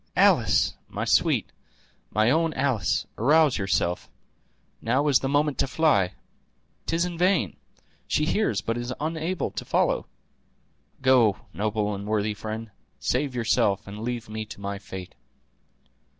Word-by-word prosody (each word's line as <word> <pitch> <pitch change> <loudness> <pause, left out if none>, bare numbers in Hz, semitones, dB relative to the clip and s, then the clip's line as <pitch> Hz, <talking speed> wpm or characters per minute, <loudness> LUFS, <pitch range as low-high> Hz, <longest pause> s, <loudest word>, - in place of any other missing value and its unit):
Alice! - - +4 0.2
my - - -3
sweet, - - +2 0.6
my 110 +3 +2
own 165 +1 +1
Alice, 130 - 0
arouse 145 +2 +4
yourself; 90 -3 0 0.7
now 130 +6 +1
is 140 -3 +5
the 135 - -2
moment 145 0 +1
to - - +2
fly. 130 - +2 0.7
'Tis 165 +1 +1
in 175 -2 -5
vain! 180 - +2 0.5
she 150 - +1
hears, 155 - +1
but 115 +6 -2
is 120 +1 -4
unable 160 +3 -2
to - - -5
follow. - - +1 1.0
Go, 125 -6 +5 0.2
noble 105 0 -1
and 100 +1 -6
worthy 105 0 0
friend; 110 +1 -6 0.3
save 130 0 -1
yourself, 115 -5 +1
and 100 +1 -8
leave 120 0 -4
me 110 0 -4
to 105 - -11
my 100 0 -4
fate." 95 -2 -8
120 Hz, 135 wpm, -26 LUFS, 105-150 Hz, 1.0 s, is